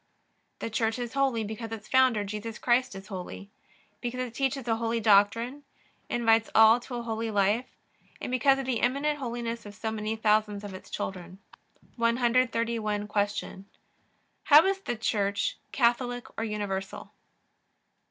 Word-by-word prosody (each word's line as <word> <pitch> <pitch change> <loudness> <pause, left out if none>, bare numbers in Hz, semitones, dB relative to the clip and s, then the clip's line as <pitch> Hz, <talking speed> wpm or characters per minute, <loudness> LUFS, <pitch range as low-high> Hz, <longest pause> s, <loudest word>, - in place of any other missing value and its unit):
The 230 - -5
Church 225 +1 0
is 240 -2 -5
Holy 270 -5 +1
because 220 +2 -6
its 220 -2 -7
founder, 255 -5 +4
Jesus 210 +2 -5
Christ, 250 -2 +1
is 195 0 -9
holy; 195 +1 -7 0.5
because 245 0 -4
it 250 -2 -4
teaches 270 0 -1
a 225 -1 +1
holy 230 0 -1
doctrine; 225 +6 +3 0.5
invites 225 -2 +3
all 220 +2 +7
to 245 +1 -8
a 240 - -4
holy 225 0 -3
life; 205 +4 +1 0.5
and - - -5
because 270 +2 +4
of 270 - -3
the 250 -3 -1
eminent 285 +4 +1
holiness 235 -2 -4
of 205 0 -11
so 220 +1 -3
many 215 0 -3
thousands 210 -1 +1
of 205 -2 -7
its 185 - -10
children. 180 -1 -5 0.6
131. 230 -3 +1
Q. 205 -2 -2 0.8
How 300 +3 +8
is 390 0 +1
the 240 - -3
Church 200 -2 -1
Catholic 245 0 +1
or 225 - -2
universal? 205 -3 -4
230 Hz, 150 wpm, -28 LUFS, 210-245 Hz, 0.8 s, How